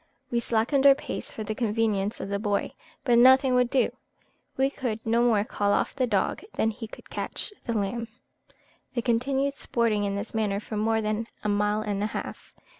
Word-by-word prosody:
We 235 - +2
slackened 240 +5 +2
our 275 - +8
pace 290 - -6
for 220 - -5
the 215 - -3
convenience 215 -2 0
of - - -5
the 200 0 -1
boy, 205 -1 -1 0.3
but 240 -3 +4
nothing 260 +1 +6
would 250 -1 +3
do; 265 0 +2 0.7
we 270 +1 +2
could 245 -6 -3
no 230 +1 +3
more 225 -4 +3
call 205 -1 0
off - - 0
the 260 -2 +1
dog 200 -4 0
than 225 - +1
he 225 +1 -7
could - - -14
catch 415 - -4
the 230 -2 -1
lamb. 230 +3 -2 0.9
They 240 - 0
continued 270 +4 +1
sporting 230 -6 0
in 200 -1 -1
this 200 +2 -5
manner 210 -3 0
for 215 - -7
more 220 +1 +1
than 215 +1 -2 0.2
a 210 - 0
mile 210 +1 +1
and 205 -2 -2
a 210 - +1
half. - - -6
225 Hz, 195 wpm, -27 LUFS, 210-245 Hz, 0.9 s, our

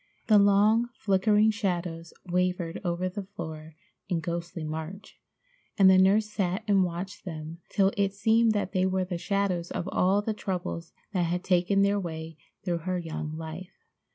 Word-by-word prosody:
The 215 -2 +6
long, 210 +4 +4
flickering 210 +2 +3
shadows 175 -6 -3
wavered 180 -1 -1
over 175 0 -1
the 185 +3 -4
floor 155 -3 -7 0.3
in 175 - +1
ghostly 170 0 -4
march, 160 +6 -6 0.6
and 190 -2 +7
the 190 - +6
nurse 200 +3 +4
sat 200 -1 -2
and 200 -2 +4
watched 180 +3 -5
them 160 -2 -7
till 195 -1 +3
it 200 -1 +1
seemed 225 +2 +3
that 205 -2 -1
they 185 -1 +2
were 185 0 0
the 175 -2 -4
shadows 185 -2 -1
of 175 - -4
all 195 +3 +2
the 220 - -1
troubles 180 -4 -4 0.2
that 180 -3 +1
had 175 +2 -1
taken 190 +2 +3
their 200 +1 +2
way 160 -3 -6 0.3
through 175 -3 -1
her 180 +2 -2
young 160 -2 -5
life. 165 +3 -8
185 Hz, 165 wpm, -28 LUFS, 170-200 Hz, 0.6 s, and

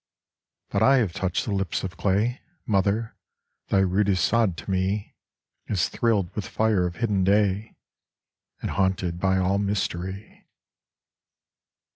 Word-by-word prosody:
But 100 - -1
I 135 +5 +6
have 105 -9 +1
touched 95 -1 -1
the 105 - -2
lips 95 -1 -1
of 95 -2 -5
clay 105 +8 0 0.2
Mother, 105 +2 0 0.5
thy 95 - +3
rudest 95 -1 +2
sod 110 -7 +2
to - - -5
me 95 +2 -1 0.5
Is 95 -5 0
thrilled 105 -7 0
with 105 - -3
fire 105 -5 +1
of 85 - -7
hidden 100 0 0
day, 100 +2 +1 0.9
And - - -2
haunted 95 -3 0
by 95 0 +2
all 95 +1 +1
mystery. 100 -1 -3
100 Hz, 130 wpm, -25 LUFS, 95-105 Hz, 0.9 s, I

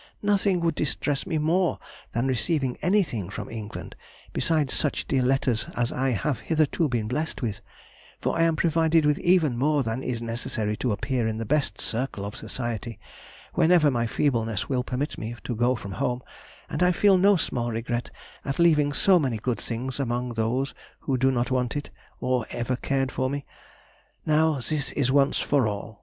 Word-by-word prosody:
Nothing 200 -3 +2
would 165 -1 +2
distress 145 -2 -1
me 160 - 0
more 170 +4 +2 0.4
than 120 +2 0
receiving 130 +1 0
anything 160 - +1
from 100 0 -6
England 110 -2 -7 0.4
besides 155 -5 +1
such 145 - 0
dear 135 -4 +2
letters 125 -3 +1
as 120 -1 0
I 135 +1 0
have 130 +3 -1
hitherto 155 0 +1
been 115 -4 -1
blessed 150 +4 -2
with, 110 -4 -2 0.6
for - - -1
I - - +1
am 165 -1 +3
provided 160 -1 +3
with 150 0 +2
even 170 -7 +3
more 145 +1 +2
than 115 +2 -2
is 125 -3 -2
necessary 115 -2 -2
to 125 - 0
appear 120 +2 -1
in 110 -1 -2
the 115 - -3
best 150 +5 0
circle 115 -4 -3
of 100 - -6
society, 115 0 -4 0.5
whenever 165 -3 +5
my 120 -2 0
feebleness 115 -5 0
will 125 -2 0
permit 130 +4 -3
me 110 +2 -5
to 120 - -3
go 120 +3 +2
from 100 -4 -7
home, 125 +5 -2 0.4
and - - -4
I 180 0 +5
feel 195 +1 +5
no 200 +2 +6
small 120 -8 -1
regret 120 +1 -2 0.3
at 135 - -3
leaving 150 -4 +4
so 185 +4 +4
many 130 -7 0
good 115 0 -2
things 125 +3 -4
among 125 -1 -1
those 120 +4 -1 0.3
who 135 - 0
do 130 +1 +3
not 125 0 0
want 125 0 0
it, 145 - -6 0.3
or 125 -2 0
ever 120 +2 -1
cared 135 +1 -1
for 130 0 -1
me. 140 0 -4 0.8
Now, 155 -2 +3
this 150 -2 -1
is 130 -3 +1
once 140 0 +3
for 140 -6 +2
all! 105 +1 -5
130 Hz, 180 wpm, -26 LUFS, 120-150 Hz, 0.8 s, no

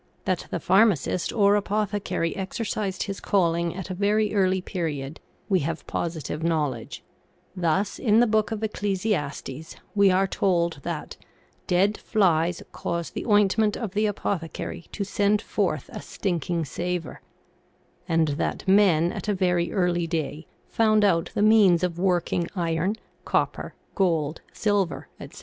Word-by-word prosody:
That 185 -2 -1
the - - -2
pharmacist 190 -1 +2
or 205 -2 +4
apothecary 205 -4 -1
exercised 195 0 -3
his 195 -1 -5
calling 170 -3 +1
at 190 0 -6
a - - -1
very 205 +3 +1
early 190 -2 +2
period 160 -6 -4 0.3
we 190 -3 +3
have 160 +1 -3
posi 165 -3 -3
tive 150 - -4
knowledge; 150 -8 -2 0.5
thus 180 +3 0
in 220 -2 +4
the 240 - +6
Book 215 -1 +1
of 220 -1 -4
Ecclesiastes 185 -9 -2 0.2
we 200 -2 +5
are 190 +1 +3
told 170 -5 0
that - - -5 0.2
" - - -35
dead 195 +4 +2
flies 175 -4 +1
cause 170 -1 -3
the - - -5
ointment 210 0 +3
of 220 -6 -5
the 210 +1 +2
apothecary 175 -4 -4
to 205 - -3
send 205 +1 +1
forth 185 - -1
a - - -6
stinking 170 -3 -2
savor," 175 +2 -4 0.9
and 165 -2 +2
that - - -2
men 185 -4 +4
at - - -6
a 205 - +1
very 180 -2 +1
early 175 -3 +1
day 160 -2 -3 0.2
found 215 -2 +3
out 165 -4 +2
the 205 - +2
means 205 -5 +5
of 175 -1 -1
working 175 -2 +1
iron, 170 +3 0 0.3
copper, - - -1 0.2
gold, 165 -5 0
silver, 205 -5 0
etc. - - -10
185 Hz, 145 wpm, -25 LUFS, 165-205 Hz, 0.9 s, the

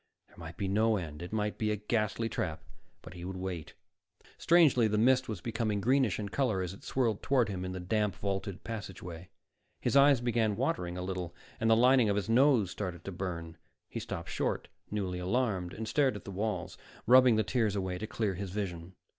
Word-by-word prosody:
There - - -22
might 85 0 -9
be 100 - -2
no 110 +3 +2
end; 80 -4 -6
it 90 - -7
might 105 -1 -2
be 110 - 0
a 105 - +1
ghastly 105 +1 -1
trap, 80 -7 -3 0.4
but - - -10
he 90 -1 -9
would 95 +1 -5
wait. 90 -4 -5 0.6
Strangely, 155 -9 +5
the 105 0 0
mist 130 +3 +3
was 105 -6 -4
becoming 110 -3 -1
greenish 125 0 +2
in 105 -2 -4
color 110 -5 0
as 90 0 -4
it 100 - -14
swirled 115 -6 0
toward 125 -6 +2
him 95 -2 -4
in 95 - -4
the 95 - -5
damp 105 +2 0
vaulted 100 -1 -3
passageway. 95 -6 -7 0.5
His - - -1
eyes 140 -1 +6
began 115 -3 +1
watering 90 -2 -1
a 90 - -3
little 90 -2 -4 0.2
and 115 - +1
the 110 - +7
lining 125 -1 +5
of 100 - +2
his 105 +1 -2
nose 120 -5 +4
started 90 -5 -5
to 100 - -4
burn. 85 -3 -5 0.3
He - - -4
stopped - - -6
short, - - -2 0.2
newly 95 -4 -2
alarmed, 95 -2 0
and 110 +3 -6
stared 135 -1 +2
at 105 - -8
the 100 - -6
walls, 105 +3 -3 0.3
rubbing 125 0 +7
the 110 - +2
tears 110 -5 0
away 95 -2 -2
to 110 - -4
clear 105 -3 -1
his 95 +1 -5
vision. 90 -3 -5
105 Hz, 205 wpm, -31 LUFS, 90-115 Hz, 0.6 s, the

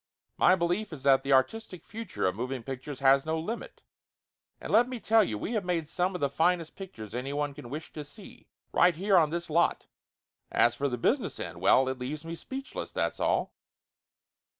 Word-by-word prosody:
My 185 - +5
belief 175 +4 -1
is 145 -4 -8
that 135 -1 +5
the 135 - -3
artistic 180 +7 0
future 225 -2 -4
of 90 - +2
moving 125 +3 -4
pictures 135 +2 -6
has 135 0 +5
no 160 0 -1
limit! 230 - -6 0.8
And - - -5
let 240 +3 +5
me 255 -2 -5
tell 225 0 +4
you, 110 - -2
we 215 - -4
have 215 -3 0
made 170 -4 -1
some 180 +3 -1
of 180 - -4
the 140 - +3
finest 165 +2 +1
pictures 115 - -9
anyone 140 +3 -2
could 125 - -10
wish 150 +6 -7
to 150 - -6
see, 185 +8 -14 0.2
right 180 - +4
here 195 +4 +2
on 160 -4 +5
this 170 +2 -3
lot 170 +2 +2 0.7
As 120 - +4
for 140 +2 -1
the 125 - -2
business 115 - 0
end - - -6
well, 130 - +5
it 130 -1 -3
leaves 145 +5 -5
me 165 - -5
speechless, 265 +10 -6
that's - - -1
all - - +1
160 Hz, 195 wpm, -29 LUFS, 135-185 Hz, 0.8 s, My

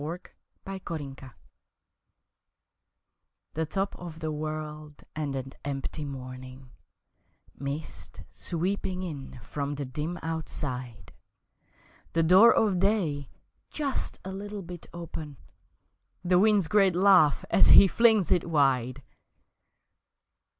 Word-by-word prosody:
On 165 +4 -3 0.5
the 195 0 -5
Mountain 145 -5 -5 2.4
THE 160 0 -2
top 195 +5 -2
of 170 -2 -8
the 160 -1 -3
world 155 0 -6
and 150 -3 -3
an 135 0 -5
empty 145 +2 -4
morning, 130 -1 -9 0.8
Mist 140 +3 -6
sweeping 185 +2 -2
in 140 -7 -7
from 145 +5 -4
the 140 0 -4
dim 150 +7 -4
Outside, 130 -7 -5 1.0
The 165 - +2
door 190 +8 +8
of 200 -5 +2
day 175 -9 0 0.4
just 285 -3 -3
a 190 - -5
little 205 +1 -6
bit 175 -1 -9
open 160 -4 -7 0.9
The 180 0 +4
wind's 205 -3 +4
great 195 -1 +3
laugh 180 -6 +5
as - - +6
he 195 - +9
flings 220 -3 +3
it 175 -2 +2
wide! 135 -4 +1
160 Hz, 110 wpm, -28 LUFS, 140-185 Hz, 2.4 s, he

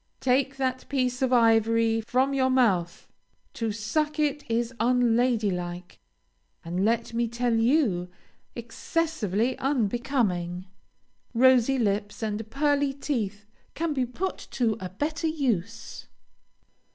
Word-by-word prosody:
Take 265 +1 +1
that 260 -1 -2
piece 255 -2 -1
of 260 -1 +1
ivory 225 -1 +3
from 255 +5 +1
your 260 -1 +2
mouth! 200 -10 +1 0.5
To 225 -2 -2
suck 295 +9 -1
it 295 -1 0
is 235 +1 -1
unlady 240 -2 +2
like, 175 0 -6 0.7
and 175 +3 -2
let 230 +2 0
me 235 0 0
tell 240 +1 -1
you, 225 - +2 0.5
excessively 240 - -1
unbecoming. 225 -8 -1 0.7
Rosy 260 +1 +5
lips 205 -1 -1
and 215 0 -3
pearly 285 +1 +1
teeth 215 -8 -3 0.3
can 330 -1 -1
be 260 -3 -1
put 370 +10 -3
to 230 -4 0
a 185 - -5
better 305 - -2
use. 230 - -3
235 Hz, 115 wpm, -26 LUFS, 215-270 Hz, 0.7 s, Rosy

